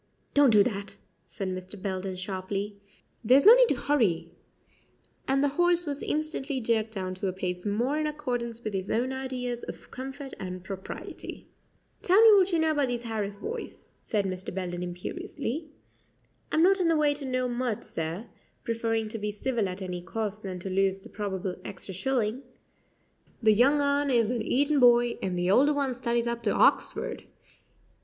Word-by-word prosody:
"Don't 285 -2 +6
do 210 -3 +6
that," 200 -3 -4 0.3
said 195 -2 -5
Mr. 185 +2 -6
Belden 190 -1 -3
sharply; 195 +2 -4 0.5
"there's 255 +7 +5
no 440 - +11
need - - +6
to - - +2
hurry 240 - +1 1.0
and 270 +1 +2
the 285 - +3
horse 350 0 +4
was 285 -2 -3
instantly 300 -3 -2
jerked 225 -2 0
down 185 -3 -4
to 185 +1 -3
a 185 - -1
pace 180 +1 -4
more 240 +9 0
in 305 - 0
accordance 245 -6 -3
with 215 - -3
his 190 0 -3
own 250 +4 0
ideas 250 -2 -3
of - - -9
comfort 270 +1 -7
and 185 -1 -6
propriety. 190 0 -8 0.5
"Tell 375 +3 +4
me 445 -1 +9
what 385 -1 +4
you 340 - +2
know 320 -1 +2
about 290 -3 +1
these 240 -1 -3
Harris 215 -3 -3
boys," 460 - -7
said 205 -3 -1
Mr. 185 -1 -4
Belden 180 -1 -4
imperiously. 285 - -5 0.8
"I'm 320 - +3
not 385 +1 +4
in 350 - +2
the 330 -1 +3
way 295 -1 +3
to 290 0 -7
know 255 -1 0
much, 240 -3 -2
sir" 165 +7 -4 0.4
preferring 225 -1 -1
to 225 - -5
be 210 0 -2
civil 215 -1 -1
at 185 +1 -6
any 180 -1 -4
cost 210 +2 -4
than 190 -3 -5
to 195 - -5
lose 195 0 +1
the - - -12
probable 190 -3 -4
extra 190 0 -7
shilling 240 +3 -1 1.0
"the 215 -1 +6
young 270 +7 +4
un 285 0 +2
is 235 -3 +3
an 240 -2 -1
Eton 285 +6 +2
boy, 240 -1 +5
and 185 -2 -2
the 175 +1 +1
older 285 +7 +5
one 275 -3 0
studies 240 -1 -1
up 235 0 -2
to 215 -3 0
Hoxford. - - +2
235 Hz, 180 wpm, -28 LUFS, 195-280 Hz, 1.0 s, no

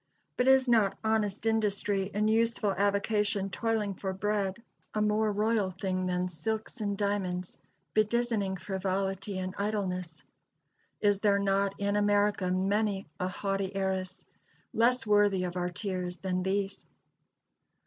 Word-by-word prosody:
But 250 - +1
is 265 -1 +6
not 220 -5 +3
honest 220 -2 0
industry 205 -3 +1
in 210 +2 +1
useful 225 -1 +2
avocation 200 0 +1
toiling 220 -1 0
for 190 +1 -4
bread 195 0 -1 0.4
a - - +1
more 215 0 +2
royal 210 -1 +1
thing 185 -1 -1
than 180 0 0
silks 220 +8 -3
and 205 -1 -1
diamonds, 190 -3 -2 0.3
bedizzening 215 -3 +1
frivolity 195 +1 -2
and 185 0 -3
idleness? 185 -7 -2 0.8
Is 205 -2 +3
there 205 -1 +3
not 200 0 +1
in 200 0 0
America 205 -2 +2
many 195 +2 +1
a 180 - 0
haughty 195 +1 -2
heiress, 190 -1 -2 0.5
less 245 +3 +3
worthy 205 -3 +3
of 180 0 -3
our 180 0 -1
tears, 180 -1 -3
than 185 -1 -2
these? 195 +1 -1
200 Hz, 130 wpm, -30 LUFS, 190-210 Hz, 0.8 s, is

